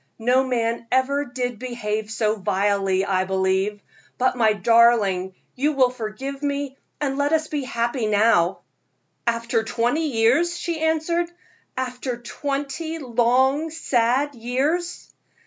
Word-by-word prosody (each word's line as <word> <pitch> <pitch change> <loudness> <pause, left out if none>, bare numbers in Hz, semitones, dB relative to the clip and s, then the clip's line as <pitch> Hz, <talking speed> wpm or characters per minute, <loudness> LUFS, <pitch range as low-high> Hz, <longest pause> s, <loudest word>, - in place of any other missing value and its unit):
No 250 +3 +3
man 235 -2 -1
ever 275 +3 +2
did 245 -2 -4
behave 220 -4 -3
so 220 -1 0
vilely, 195 -1 +1
I 185 -1 +1
believe; 190 +2 0 0.3
but, 255 0 +2
my 220 -3 +3
darling, 205 -3 +3 0.2
you 290 +4 0
will 260 -3 +3
forgive 255 +4 -6
me, 285 -1 -2 0.2
and 275 -1 -1
let 285 +2 +1
us 315 -1 +1
be 295 -2 -2
happy 235 -2 -1
now." 205 -4 +3 0.7
"After 230 0 +1
twenty 245 +8 0
years!" 275 +8 +2
she 340 -2 -3
answered 320 +2 +1 0.5
"after 250 -1 -3
twenty 285 +6 -4
long, 260 +3 +2
sad 275 -2 +1
years." 275 +9 -2
245 Hz, 125 wpm, -23 LUFS, 220-280 Hz, 0.7 s, No